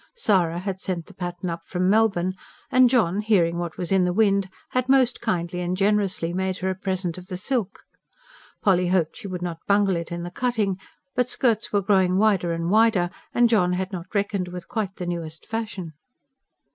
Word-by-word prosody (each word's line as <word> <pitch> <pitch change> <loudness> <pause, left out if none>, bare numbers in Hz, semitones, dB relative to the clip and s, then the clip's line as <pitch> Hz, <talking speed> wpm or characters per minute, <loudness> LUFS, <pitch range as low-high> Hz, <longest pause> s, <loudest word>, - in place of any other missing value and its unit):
Sara 185 - +2
had 190 +1 -4
sent 175 -3 -3
the 200 - -15
pattern 175 -1 -4
up 165 0 -5
from 180 0 0
Melbourne, 195 -3 +2 0.4
and 255 -1 +6
John, 210 -7 +2
hearing 175 -6 +2
what 170 -2 -4
was 180 - -3
in 190 -1 +4
the 180 - +1
wind, 200 -2 +2 0.2
had 255 0 -1
most 260 -2 +3
kindly 180 -5 -1
and 180 +1 -2
generously 195 -4 +1
made 190 0 -1
her 190 +1 -1
a - - -3
present 185 -2 -2
of 180 - -13
the 180 - -5
silk. 210 0 -2 0.8
Polly 180 -3 +3
hoped 175 -3 +1
she 220 - -7
would 180 -2 -5
not 165 -2 -5
bungle 200 -2 +3
it 170 0 -4
in 170 0 -4
the 175 - -6
cutting; 215 -4 -1 0.3
but 250 0 0
skirts 230 -4 +1
were 205 -1 +1
growing 190 -2 +3
wider 195 -5 +3
and 165 +1 -2
wider, 215 -5 +4 0.2
and 240 0 +4
John 180 -6 +3
had 185 +2 -2
not 185 +1 -7
reckoned 200 -2 0
with 180 0 -8
quite 215 -6 -3
the 180 - -5
newest 165 -2 -5
fashion. 215 -7 -5
190 Hz, 195 wpm, -24 LUFS, 175-210 Hz, 0.8 s, and